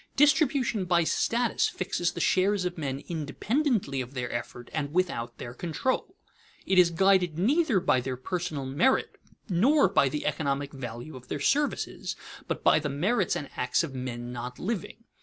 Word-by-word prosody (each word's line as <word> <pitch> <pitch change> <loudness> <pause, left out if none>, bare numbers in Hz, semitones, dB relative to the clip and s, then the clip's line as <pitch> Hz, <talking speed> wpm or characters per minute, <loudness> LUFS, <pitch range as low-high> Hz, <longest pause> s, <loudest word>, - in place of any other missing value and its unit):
_ - - -39
Distribution 275 - +3
by 175 -1 +3
status 235 +7 +1
fixes 175 -1 -1
the - - -5
shares 190 0 +2
of 180 -1 -2
men 140 -4 -4
independently 175 - -1
of 125 +2 -8
their 125 -1 -3
effort 120 0 -6
and 145 -3 -2
without 170 -9 -1
their 120 - -7
control. 255 - -2 0.5
It 190 -1 +4
is 175 -1 +6
guided 180 -1 +3
neither 260 - +3
by 130 -8 +2
their 130 0 -4
personal 155 0 -3
merit 160 - +1 0.3
nor 230 - +4
by 160 -8 +3
the 150 +3 -4
economic 140 -1 -1
value 120 +2 -7
of 125 -1 -11
their - - -3
services, 285 - 0 0.3
but - - -3
by - - +5
the 150 -1 -3
merits 185 - +1
and 145 - -5
acts 125 +5 +1
of 150 -5 -5
men 120 -2 -5
not 125 +1 -6
living. 225 +2 -4
170 Hz, 170 wpm, -28 LUFS, 135-205 Hz, 0.5 s, is